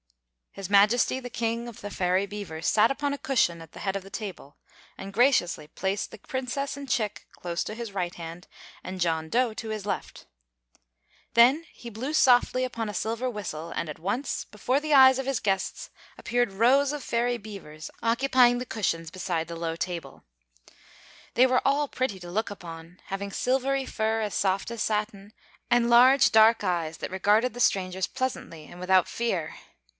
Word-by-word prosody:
His 195 -1 -7
Majesty 210 +6 +4
the 245 - -7
King 230 0 -2
of 230 - -12
the 205 - -7
Fairy 185 +1 +1
Beavers 200 -6 -6
sat 220 +3 +4
upon 285 +1 -1
a - - -3
cushion 175 -11 +1
at 165 -1 -13
the - - -11
head 195 -1 -2
of 195 - -3
the 195 - -12
table 195 -9 -7 0.4
and 195 0 -8
graciously 200 - +2
placed 190 +5 -3
the - - -10
Princess 270 +1 -4
and 280 -1 -8
Chick 215 -4 -2
close 170 0 -3
to 215 - -6
his 230 -3 -6
right 180 -2 -2
hand 170 +1 -9 0.4
and 185 0 -6
John 160 -2 0
Dough 245 +2 +2
at 215 - -8
his 215 -3 -5
left. 205 - -5 1.1
Then 260 +8 +5
he 235 - -10
blew 245 +7 -5
softly 255 -2 +4
upon 230 -3 -4
a - - -5
silver 230 +6 -2
whistle, 170 -7 -6
and 170 - -3
at 150 - -7
once 215 - -2
before 255 +7 -1
the 305 0 -1
eyes 265 -1 +7
of 270 - -4
his 270 -5 0
guests 195 -2 -2 0.3
appeared 240 -2 0
rows 260 +8 +3
of 295 -1 -4
Fairy 240 +1 0
Beavers, 195 -8 -9
occupying 245 +1 +4
the 250 - -4
cushions 165 -8 -2
beside 170 -3 -3
the 170 - -6
low 165 0 -3
table. 175 -1 -5 1.1
They 250 - +6
were 255 -1 +3
all 285 +1 +2
pretty 255 -8 -2
to 175 0 -8
look 220 +5 -1
upon, 170 -3 -10
having 200 +1 -5
silvery 265 +4 0
fur 220 -1 -1
as 210 -3 -2
soft 195 +3 0
as 235 -2 -5
satin, 210 -1 -2 0.4
and 240 0 +3
large 255 +3 +6
dark 220 +1 +6
eyes 170 -4 -1
that - - -6
regarded 210 +6 +2
the 245 - -5
strangers 185 -3 +1
pleasantly 255 - -4
and 175 - -13
without 185 -1 +3
fear. 190 -9 -2
215 Hz, 180 wpm, -27 LUFS, 185-245 Hz, 1.1 s, eyes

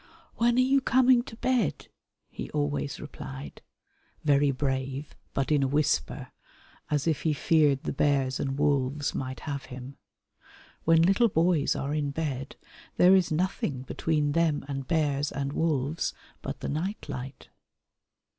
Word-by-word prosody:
"When 235 +1 +3
are - - +3
you 270 +2 +3
coming 255 -1 +4
to - - -9
bed?" 245 - 0 0.4
he - - -6
always 70 -1 -1
replied, 70 +1 -8 0.6
very 145 -1 +4
brave 135 +1 -2 0.2
but 135 +2 0
in 150 -2 +4
a 135 - +2
whisper, 140 - 0 0.6
as 145 -2 0
if 160 -3 0
he 160 - +1
feared 145 -3 +3
the - - -2
bears 135 -2 +1
and 135 0 -2
wolves 145 -1 +1
might 130 0 -4
have 140 -3 -4
him. 130 +2 -9 0.9
When 165 0 +5
little 195 +6 +4
boys 165 -4 +2
are 140 +2 -2
in 150 -2 0
bed 140 -3 -4 0.4
there 185 +2 +7
is 185 -4 +2
nothing 155 -6 -1
between 150 +2 0
them 160 -2 +1
and 135 -2 -4
bears 145 -3 +1
and 140 0 -3
wolves 155 -1 0 0.3
but - - -6
the - - -3
night 180 +8 -3
light. 130 +2 -7
145 Hz, 145 wpm, -28 LUFS, 135-165 Hz, 0.9 s, there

